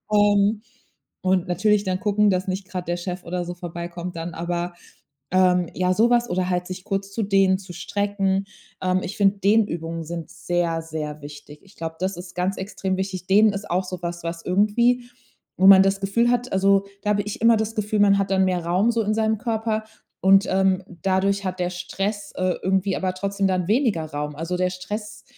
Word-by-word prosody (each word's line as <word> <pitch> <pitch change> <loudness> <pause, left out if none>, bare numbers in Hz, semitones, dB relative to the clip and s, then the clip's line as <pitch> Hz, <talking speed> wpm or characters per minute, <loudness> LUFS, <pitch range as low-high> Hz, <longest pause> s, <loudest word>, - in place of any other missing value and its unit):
Ähm, 205 +1 +3 0.6
und 185 0 +2
natürlich 205 +4 +2
dann 185 0 -1
gucken, 210 0 +3
dass 185 +1 -1
nicht 190 +1 -3
grad 180 -2 -5
der 175 - 0
Chef 180 +1 -5
oder 175 +1 -3
so 175 - -5
vorbeikommt 175 0 -6
dann. 165 +1 -5
Aber, 175 +1 -3 0.6
ähm 180 -2 +3
ja, 185 0 +1
so 230 +5 +3
was 240 0 +3
oder 185 +1 -1
halt 180 0 -1
sich 185 0 -7
kurz 195 -1 -3
zu 220 +1 -1
dehnen, 195 -1 +3
zu 185 -2 -11
strecken. 195 +1 -1 0.4
Ähm, 185 0 +1
ich 200 - -5
finde 200 0 +3
Dehnübungen 170 -6 +1
sind 165 0 -6
sehr, 170 -2 -1
sehr 155 -2 -6
wichtig. 145 0 -11
Ich 195 0 -20
glaube, 160 0 -5
das 185 -1 -2
ist 180 +1 -10
ganz 185 +2 -1
extrem 190 -1 -3
wichtig. 190 -1 -4
Dehnen 205 +2 +5
ist 200 +1 -6
auch 180 +2 +1
so 185 -1 -6
was, 170 0 -5
was 165 0 -5
irgendwie 235 +6 +2 0.5
wo 190 +1 +5
man 190 -1 +9
das 195 0 +1
Gefühl 230 +5 +2
hat 245 +1 -1
also, 195 +1 +3 0.2
da 210 - +1
habe 205 0 +2
ich 210 - -6
immer 230 0 +6
das 220 +1 -2
Gefühl, 210 -1 -1
man 200 -1 +5
hat 195 -1 -1
dann 190 0 +3
mehr 180 -2 -1
Raum 185 +7 +2
so 230 -1 0
in 210 - 0
seinem 220 0 +1
Körper 220 -1 -1 0.4
und, 195 +1 +5
ähm, 190 0 +2 0.2
dadurch 195 +1 +1
hat 185 0 -3
der 180 0 0
Stress, 195 +3 -4
äh, 185 -1 0
irgendwie 190 +1 +1
aber 185 -1 -1
trotzdem 200 +1 -2
dann 185 -2 0
weniger 215 - +1
Raum. 150 -1 -5
Also, 165 +4 -3
der 180 0 +1
Stress 210 +3 -6
190 Hz, 205 wpm, -23 LUFS, 180-205 Hz, 0.6 s, man